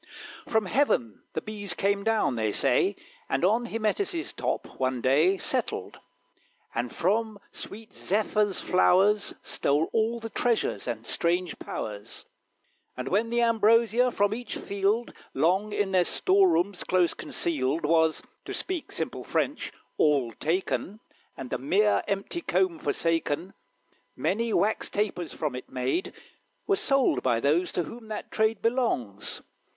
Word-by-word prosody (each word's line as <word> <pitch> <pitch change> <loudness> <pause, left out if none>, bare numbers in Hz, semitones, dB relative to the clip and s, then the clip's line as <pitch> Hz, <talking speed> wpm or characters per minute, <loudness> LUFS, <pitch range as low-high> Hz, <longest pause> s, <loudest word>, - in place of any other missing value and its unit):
From 220 -2 +1
heaven 155 - +1
the - - -3
Bees 205 -4 -3
came 200 0 +1
down, 225 - +2
they 110 -3 0
say, 135 - +3 0.3
And 135 +6 +1
on 225 +5 +2
Hymettus' 325 - -1
top, - - -3
one 130 -1 0
day, 150 +10 +3
Settled, - - -2 0.7
and 120 0 -2
from 215 +4 0
sweet 220 +2 -10
Zephyr's 210 0 0
flowers 195 +3 +3
Stole 145 +3 +1
all 225 +1 +1
the 225 -1 -7
treasures 235 - 0
and 115 -2 -4
strange 175 +4 0
powers; 105 0 -6 0.7
And 130 +1 -4
when 215 +4 +1
th' 235 - -3
ambrosia 230 +2 +4
from 205 -2 +1
each 240 +2 -5
field, 200 +4 -1 0.2
Long 190 +6 +2
in 205 -2 0
their 185 -1 +4
store 190 +2 +3
rooms 175 +3 0
close 180 -2 +2
concealed, 150 -1 -1
Was, 160 0 +2 0.2
to - - -4
speak 365 -4 -3
simple - - -4
French, - - -1 0.3
all 140 -6 +3
taken, 185 - -2 0.4
And 130 -2 -7
the - - -1
mere 200 +10 +3
empty 200 - -2
comb 185 - +1
forsaken, 165 +3 -1 0.6
Many 230 +4 0
Wax 215 +1 +1
Tapers, 205 -4 -2
from 150 -4 -3
it 125 - -7
made, 130 - -1 0.5
Were 400 - +3
sold 275 - +2
by 115 - +2
those 155 +8 +1
to 175 - 0
whom 230 +5 -10
that 215 -1 -6
trade 220 -1 +1
Belongs. 225 - -1
195 Hz, 140 wpm, -27 LUFS, 155-220 Hz, 0.7 s, ambrosia